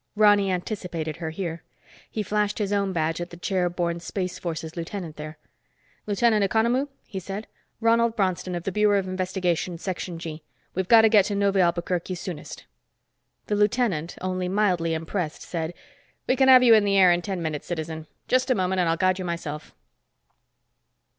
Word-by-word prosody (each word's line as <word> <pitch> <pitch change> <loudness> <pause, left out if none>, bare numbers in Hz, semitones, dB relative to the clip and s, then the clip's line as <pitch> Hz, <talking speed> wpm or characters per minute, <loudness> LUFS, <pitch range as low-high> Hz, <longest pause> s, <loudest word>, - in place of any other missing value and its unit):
Ronny 205 -2 +5
anticipated 175 -4 -3
her 165 -2 -4
here. 165 0 -4 0.5
He 215 - -3
flashed 210 +1 0
his 205 -1 -1
own 200 -1 +1
badge 165 -1 -1
at 175 - -5
the 170 - -11
chair 180 0 0
borne 170 -1 -2
Space 180 +1 -4
Forces 160 -2 -5
lieutenant 170 -1 -5
there. 155 0 -8 0.7
"Lieutenant 210 +1 +3
Economou?" 235 +7 +2 0.2
he 195 - -6
said. 195 +4 -6 0.3
"Ronald 230 0 +3
Bronston, 185 -3 -1
of 175 - -4
the 195 - -2
Bureau 210 +1 +3
of 190 -1 -1
Investigation, 185 -2 -1
Section 180 -1 -4
G. 160 -1 -7 0.3
We've 190 0 -2
got 225 +1 +7
to 220 - +6
get 210 -3 +5
to 205 - -2
Neuve 200 -1 +2
Albuquerque 175 0 0
soonest." 175 -4 -7 0.8
The 210 - -1
lieutenant, 205 -6 +1
only 185 0 -2
mildly 180 -4 +1
impressed, 160 0 -4
said, 165 -1 -3 0.5
"We 255 - +2
can 265 0 +3
have 255 -1 +8
you 235 -2 +7
in 215 -2 +6
the 200 -1 +2
air 185 -2 +7
in 175 0 +2
ten 190 0 -3
minutes, 155 -3 -4
citizen. 160 -2 -5 0.2
Just 255 +1 +2
a 255 - +4
moment 185 -1 0
and 170 - +1
I'll 165 - +1
guide 185 +1 +2
you 185 - -4
myself." 160 -3 -5
185 Hz, 180 wpm, -25 LUFS, 170-205 Hz, 0.8 s, have